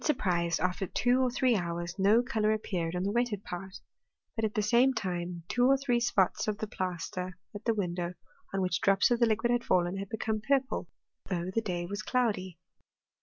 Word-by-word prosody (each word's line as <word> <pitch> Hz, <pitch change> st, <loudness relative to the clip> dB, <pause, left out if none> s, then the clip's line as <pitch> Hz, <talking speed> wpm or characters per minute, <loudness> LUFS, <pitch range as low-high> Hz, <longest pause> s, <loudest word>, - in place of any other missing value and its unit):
surprise, 175 Hz, -, +1 dB
after 180 Hz, +3 st, -1 dB
two 250 Hz, +6 st, +2 dB
or 255 Hz, -, +3 dB
three 250 Hz, 0 st, +2 dB
hours, 175 Hz, 0 st, -3 dB
no 210 Hz, +5 st, +5 dB
colour 220 Hz, -4 st, +1 dB
appeared 180 Hz, -6 st, -2 dB
on 180 Hz, -, -1 dB
the 200 Hz, -, 0 dB
wetted 230 Hz, -3 st, 0 dB
part; 185 Hz, +2 st, -7 dB, 0.6 s
but, 225 Hz, -, -2 dB
at 215 Hz, -1 st, -1 dB
the 210 Hz, -, +2 dB
same 245 Hz, +5 st, +4 dB
time, 175 Hz, -2 st, -3 dB
two 245 Hz, 0 st, +3 dB
or 275 Hz, +1 st, +5 dB
three 250 Hz, -3 st, +1 dB
spots 225 Hz, -7 st, +1 dB
of 210 Hz, -1 st, -1 dB
the 220 Hz, -, -3 dB
plaster 185 Hz, -1 st, -4 dB, 0.2 s
at 205 Hz, -, -8 dB
the 230 Hz, -, +3 dB
window, 175 Hz, -3 st, -2 dB, 0.4 s
on 195 Hz, -, -1 dB
which 180 Hz, -3 st, 0 dB
drops 195 Hz, +5 st, +4 dB
of 240 Hz, -, +3 dB
the 235 Hz, -, +5 dB
liquid 225 Hz, +2 st, +1 dB
had 240 Hz, -1 st, +1 dB
fallen, 180 Hz, +1 st, +1 dB
had 195 Hz, 0 st, -5 dB
become 220 Hz, -1 st, -2 dB
purple; 270 Hz, +3 st, 0 dB, 0.4 s
though 180 Hz, -1 st, -2 dB
the 225 Hz, -, +1 dB
day 175 Hz, -5 st, -3 dB
was 200 Hz, +3 st, -4 dB
cloudy. 210 Hz, -8 st, -1 dB
200 Hz, 200 wpm, -30 LUFS, 180-235 Hz, 0.6 s, no